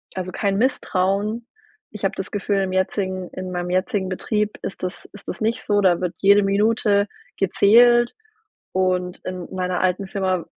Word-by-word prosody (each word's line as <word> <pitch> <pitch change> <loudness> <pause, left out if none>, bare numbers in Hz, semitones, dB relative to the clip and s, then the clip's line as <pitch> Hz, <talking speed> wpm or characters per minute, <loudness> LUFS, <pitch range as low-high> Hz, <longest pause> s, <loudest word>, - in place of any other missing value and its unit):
also 185 -1 -4
kein 195 +1 0
Misstrauen. 210 -1 0 0.5
Ich 210 -2 -10
habe 195 - +1
das 190 - -6
Gefühl 205 -1 0
im 190 -1 -2
jetzigen 185 -1 -1
in 185 0 -6
meinem 175 0 -3
jetzigen 190 +1 0
Betrieb 210 +3 -1
ist - - -6
das 180 0 -5
ist 205 - -14
das - - -6
nicht 230 +3 -1
so, 205 0 +2
da 180 -3 +3
wird 180 -2 -2
jede 200 +1 +6
Minute 205 0 +2 0.3
gezählt 240 +5 +5 0.6
und 185 -1 0
in 185 -1 -5
meiner 180 -1 -1
alten 185 +1 0
Firma, 185 -3 -1
195 Hz, 165 wpm, -22 LUFS, 185-210 Hz, 0.6 s, jede